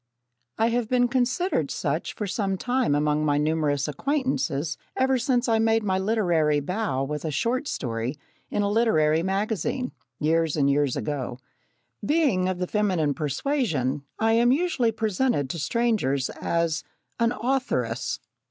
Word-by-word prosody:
I 225 +1 +3
have 235 -1 -1
been 245 -1 +3
considered 255 +9 0
such - - -2
for 210 - -3
some 195 -1 -1
time 245 - +1
among 150 +1 +1
my 145 -1 +2
numerous 150 -2 +1
acquaintances 165 - -1 0.2
ever 260 0 +2
since 245 +1 +1
I 225 -1 +3
made 225 0 +3
my 190 -2 +1
literary 175 -8 +2
bow 180 -3 -1
with 150 +2 -4
a 160 - -2
short 235 - -1
story 120 +2 -3 0.3
in 205 - 0
a 200 - 0
literary 165 -9 +3
magazine, 210 - -1 0.3
years 160 +1 +1
and 140 -2 +3
years 140 -2 +1
ago. 135 -5 -3 0.7
Being 275 - +2
of 185 - -2
the 180 - -1
feminine 180 -8 +1
persuasion, 150 - -1 0.2
I 225 0 +2
am 235 +2 +4
usually 275 -6 +2
presented 215 - 0
to 170 - -5
strangers 175 - 0
as 170 -1 -1 0.4
"an 230 0 +3
authoress." 235 - -1
190 Hz, 145 wpm, -25 LUFS, 150-240 Hz, 0.7 s, am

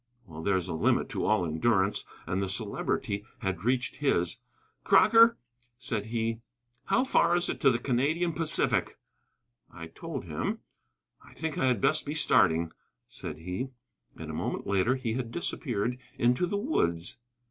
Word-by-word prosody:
Well, 80 -4 -9
there 100 +3 +2
is 90 - -3
a 90 - -3
limit 80 - +1
to - - -2
all 105 -5 +2
endurance, 95 +5 +1 0.2
and 95 +3 -1
the 95 - -2
Celebrity 100 +1 -2 0.2
had 95 -2 -3
reached 125 +1 0
his. 90 - 0 0.4
"Crocker," 230 +1 +6
he 120 0 -39
said, 115 -1 -2 0.5
"how 255 - +2
far 255 -9 +3
is 175 - 0
it - - -4
to 135 - +6
the 120 - +2
Canadian 145 +8 0
Pacific?" 165 0 +2 0.7
I 85 - -9
told 140 - -7
him. 80 -1 -3 0.6
"I - - -17
think 160 -2 -3
I 130 - +2
had 125 -6 +1
best 155 - +3
be 145 - -3
starting," 80 - +3 0.3
said - - -8
he. 90 +10 -4 0.5
And - - -7
a - - -7
moment - - -3
later 100 +6 +2
he 125 -4 -3
had 120 -1 -3
disappeared 125 -6 -2 0.2
into 125 +9 +2
the 200 - -1
woods. 90 - -1
120 Hz, 160 wpm, -29 LUFS, 95-140 Hz, 0.7 s, Crocker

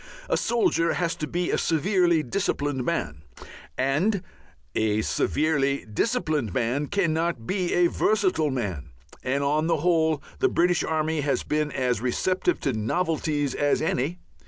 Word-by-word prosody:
A - - +2
soldier 195 -8 +1
has 170 -1 0
to 155 - -3
be 175 +2 -1
a - - +1
severely 170 0 +2
disciplined 145 -4 -1
man, 75 - -2 0.6
and 170 +10 +1 0.5
a 110 0 +1
severely 140 -1 0
disciplined 150 - -1
man 125 +5 0
cannot 165 - 0
be 185 - -1
a 175 - +4
versatile 185 -5 +1
man, 95 - -3 0.3
and 140 +2 -1
on 150 +3 +1
the 165 -1 +2
whole 160 -2 +2 0.2
the 390 - +3
British 175 - +2
army 155 -1 0
has 140 0 0
been 150 0 -1
as 125 -4 0
receptive 185 - 0
to 135 - 0
novelties 145 +4 -1
as 145 0 +1
any. 155 +2 -1
155 Hz, 140 wpm, -25 LUFS, 135-175 Hz, 0.6 s, a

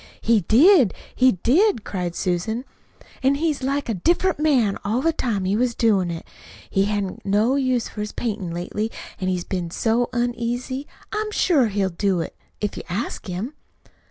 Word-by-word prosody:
"He 230 -1 +4
did, 260 - +5 0.2
he 255 0 +4
did," 260 - +2
cried 180 -3 -3
Susan, 205 +8 -1 0.6
"an' 270 +1 +3
he 325 +3 +1
was 295 - -2
like 275 +2 -1
a 230 - 0
different 345 - +1
man 260 -10 +2
all 215 +4 0
the 330 +4 +2
time 215 -10 -1
he 190 +2 +1
was 240 +1 +1
doin' 200 -6 +2
it. 165 -1 -5 0.5
He 195 0 +3
hain't 205 -1 0
had 185 - -8
no 210 +6 +2
use 255 -4 +1
for 210 - -6
his 210 - -4
paintin' 210 -6 -3
lately, 180 +6 -3 0.3
an' 185 - -2
he's 180 -1 0
been 180 -3 -3
so 230 +7 +1
uneasy. 245 +3 -2 0.3
I'm 425 0 -1
sure 320 - +3
he'll 200 -2 0
do 190 +1 0
it, 165 - -4 0.2
if 205 -1 -3
you - - -5
ask 200 +5 -3
him." 190 +10 -4
225 Hz, 185 wpm, -23 LUFS, 195-260 Hz, 0.6 s, did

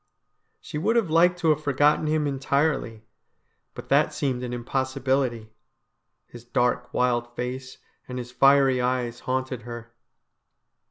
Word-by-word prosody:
She 150 - -6
would 225 +9 +1
have 215 -9 +1
liked 175 +2 +4
to 160 - +2
have 155 0 +2
forgotten 145 +2 +2
him 155 0 +1
entirely, 135 -4 -1 0.7
but - - -10
that - - +3
seemed 130 -3 -1
an 125 -1 -4
impossibility. 130 -2 -1 0.7
His 120 -1 -13
dark, 125 0 0
wild 120 -1 0
face 130 +1 -5 0.3
and 125 - -6
his 125 0 -6
fiery 135 0 +4
eyes 125 -1 -1
haunted 130 -1 -3
her. 120 0 -9
130 Hz, 130 wpm, -25 LUFS, 120-140 Hz, 0.7 s, liked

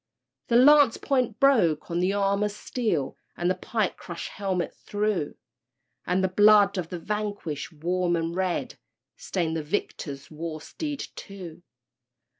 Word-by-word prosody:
_ - - -44
The 235 - +1
lance 280 0 +7
point 250 -5 0
broke 200 - +3
on 170 - 0
the 180 +2 +2
armor's 200 +1 +1
steel, 210 - -2 0.2
And 175 +1 +1
the - - +3
pike 215 0 -2
crushed 170 -2 -7
helmet 190 -3 -2
through, 205 -7 -2 0.7
And 180 +2 +1
the - - +4
blood 205 0 +5
of 170 -2 -4
the 180 - -4
vanquished, 205 -6 -4
warm 175 +3 0
and 165 0 -2
red, 185 -1 -2 0.4
Stained 180 - -2
the 160 - -1
victor's 150 -4 -4
war 155 0 -5
steed, 295 - -5
too! 180 -4 -9
190 Hz, 145 wpm, -26 LUFS, 170-210 Hz, 0.7 s, lance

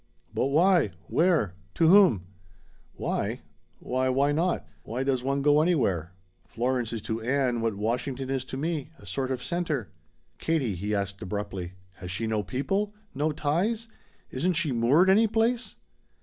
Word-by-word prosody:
"But - - +1
why? 170 +5 +3 0.2
Where? 160 - +2 0.2
To 165 - +3
whom?" 175 - +6 0.7
"Why? - - -2 0.4
Why, 130 +1 -1
why 140 +3 +2
not? 170 +4 0
Why 125 +4 -3
does 135 -2 +1
one 140 +2 -1
go 145 +1 +5
anywhere? 100 - +1 0.3
Florence 125 -1 -1
is 115 -3 -4
to 110 0 -3
Ann 125 -1 +1
what 115 -2 0
Washington 125 +5 -2
is 135 -1 -1
to 130 - -6
me 155 0 -2
a - - -16
sort 130 +7 -2
of 130 -2 -3
center." 160 - -2 0.5
"Katie," 150 -10 0
he 100 +4 -2
asked 100 -1 -3
abruptly, 95 -2 -4 0.2
"has 90 - -7
she 95 +5 -2
no 110 -1 0
people? 195 - -1 0.2
No 150 +3 0
ties? 185 +11 -1 0.4
Isn't 175 +8 0
she 165 -3 0
moored 130 +10 +4
any 210 +4 +5
place?" 230 +3 0
135 Hz, 155 wpm, -27 LUFS, 115-165 Hz, 0.7 s, whom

